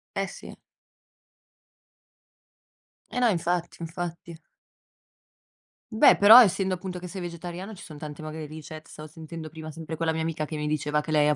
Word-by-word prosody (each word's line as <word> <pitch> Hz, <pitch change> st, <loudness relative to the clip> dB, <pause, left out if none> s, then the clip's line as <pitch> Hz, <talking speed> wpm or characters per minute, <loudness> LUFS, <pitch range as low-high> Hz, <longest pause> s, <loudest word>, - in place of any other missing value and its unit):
Eh, -, -, -1 dB
sì. -, -, -10 dB, 2.5 s
Eh, -, -, -3 dB
no, 245 Hz, -, +4 dB
infatti, 175 Hz, -2 st, -1 dB
infatti. 170 Hz, 0 st, -6 dB, 1.5 s
Beh, 220 Hz, -, +6 dB
però 220 Hz, +5 st, +10 dB
essendo, 190 Hz, -3 st, +2 dB
appunto, 180 Hz, 0 st, -5 dB
che 180 Hz, 0 st, -7 dB
sei 190 Hz, +1 st, -7 dB
vegetariano, 175 Hz, +4 st, -6 dB
ci -, -, -12 dB
sono 150 Hz, -3 st, -11 dB
tanti 150 Hz, -1 st, -8 dB
magari 155 Hz, 0 st, -6 dB
ricett 155 Hz, +1 st, -10 dB
stavo 155 Hz, 0 st, -10 dB
sentendo 160 Hz, 0 st, -9 dB
prima, 160 Hz, 0 st, -9 dB
sempre 160 Hz, 0 st, -7 dB
quella 160 Hz, 0 st, 0 dB
mia 160 Hz, -, -2 dB
amica, 160 Hz, -1 st, -2 dB
che 155 Hz, -, -6 dB
mi 150 Hz, -, -3 dB
diceva 150 Hz, 0 st, 0 dB
che 155 Hz, -, -6 dB
lei 150 Hz, -1 st, +4 dB
ha 150 Hz, -, +3 dB
165 Hz, 165 wpm, -26 LUFS, 155-180 Hz, 2.5 s, però